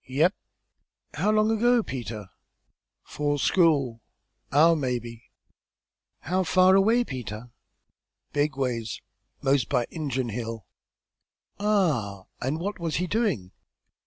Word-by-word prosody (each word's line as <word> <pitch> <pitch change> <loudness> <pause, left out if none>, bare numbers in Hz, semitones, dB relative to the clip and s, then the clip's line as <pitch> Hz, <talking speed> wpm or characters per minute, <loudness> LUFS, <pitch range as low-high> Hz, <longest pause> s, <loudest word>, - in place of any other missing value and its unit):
"Yep!" 155 +9 +2 0.8
"How 210 - 0
long 215 +1 +3
ago, 240 +1 +3
Peter?" 110 - -6 0.7
"'Fore 145 0 -2
school 140 -8 +2 0.5
hour, 165 +4 +5
maybe." 120 -5 -3 1.0
"How 185 +7 0
far 185 +2 +5
away, 220 +5 +4
Peter?" 120 - -7 0.8
"Big 145 -1 0
ways. 120 -4 -2 0.4
Most 135 -1 +2
by 125 -4 +1
Injun 135 -6 -2
Hill." 115 -2 -5 0.9
"Ah! 155 - +1 0.2
and 135 +6 -1
what 200 +3 -4
was 165 -2 -2
he 180 - 0
doing?" 180 - -1
145 Hz, 105 wpm, -26 LUFS, 120-185 Hz, 1.0 s, hour